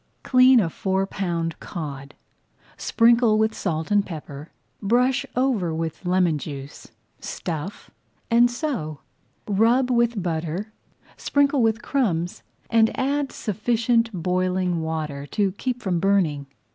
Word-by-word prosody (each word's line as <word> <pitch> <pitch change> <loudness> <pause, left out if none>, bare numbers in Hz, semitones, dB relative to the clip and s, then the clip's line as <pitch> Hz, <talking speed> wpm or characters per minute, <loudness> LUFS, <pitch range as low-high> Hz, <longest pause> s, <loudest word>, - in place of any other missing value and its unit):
Clean 255 -1 +6
a 195 - +2
four 190 +3 -1
pound 170 -4 -3
cod, 140 -4 -7 0.6
sprinkle 230 -1 +3
with 220 0 +2
salt 160 -3 -3
and 205 -1 +4
pepper, 150 -4 -8 0.3
brush 250 +5 +2
over 235 -11 +1
with 165 +2 -4
lemon 180 -4 +2
juice, 140 -2 -8 0.3
stuff, 165 +3 -6 0.4
and 240 +1 +5
sew. 240 - -4 0.5
Rub 230 +5 +3
with 235 -4 +1
butter, 170 +5 -3 0.4
sprinkle 285 -1 +2
with 225 0 +1
crumbs, 180 -11 -1 0.3
and 225 -1 +4
add 280 +1 0
sufficient 230 +2 0
boiling 180 -1 0
water 155 -3 -4
to 200 +2 0
keep 245 +5 -4
from 180 -3 0
burning. 170 -7 +1
195 Hz, 120 wpm, -23 LUFS, 165-235 Hz, 0.6 s, Clean